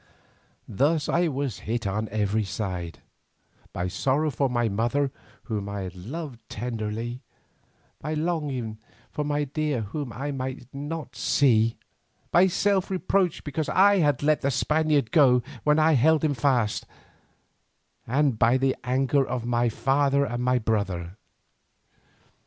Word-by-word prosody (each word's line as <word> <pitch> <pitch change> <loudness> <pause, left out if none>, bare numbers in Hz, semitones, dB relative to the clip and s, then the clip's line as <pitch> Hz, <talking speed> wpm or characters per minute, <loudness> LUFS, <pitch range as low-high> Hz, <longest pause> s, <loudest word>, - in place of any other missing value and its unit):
Thus 145 +8 +1
I 175 0 +2
was 140 - -3
hit 115 -1 -1
on 105 +2 -2
every 105 +1 0
side; 90 -3 -5 0.7
by 90 +1 -2
sorrow 140 - 0
for 135 +1 0
my 120 -1 +1
mother 120 +7 0 0.3
whom 105 -4 -4
I 100 0 -4
had 95 -1 -6
loved 130 - -7
tenderly, 115 +1 -4 0.8
by 155 +2 -3
longing 145 -9 -2 0.3
for 150 - -2
my 145 0 0
dear 145 -2 -1
whom 125 +5 -5
I 140 +5 -4
might 130 -2 -5
not 145 +3 -6
see, 115 -5 +3 0.5
by 180 +3 +6
self 195 +1 +1
reproach 185 -2 0
because 150 +1 -3
I 200 +1 +5
had 145 -5 +2
let 155 0 +3
the 140 - +1
Spaniard 150 -1 +1
go 125 -5 +5 0.2
when 150 0 +3
I 155 +1 +4
held 155 +4 +4
him 155 -2 +2
fast, 120 -5 0 1.2
and 135 -2 +1
by 120 +3 +4
the 130 0 +1
anger 135 +2 +2
of 125 -2 -3
my 120 0 +1
father 140 +4 +2
and 120 0 -3
my 125 0 +3
brother. 100 -6 -2
130 Hz, 140 wpm, -26 LUFS, 115-150 Hz, 1.2 s, by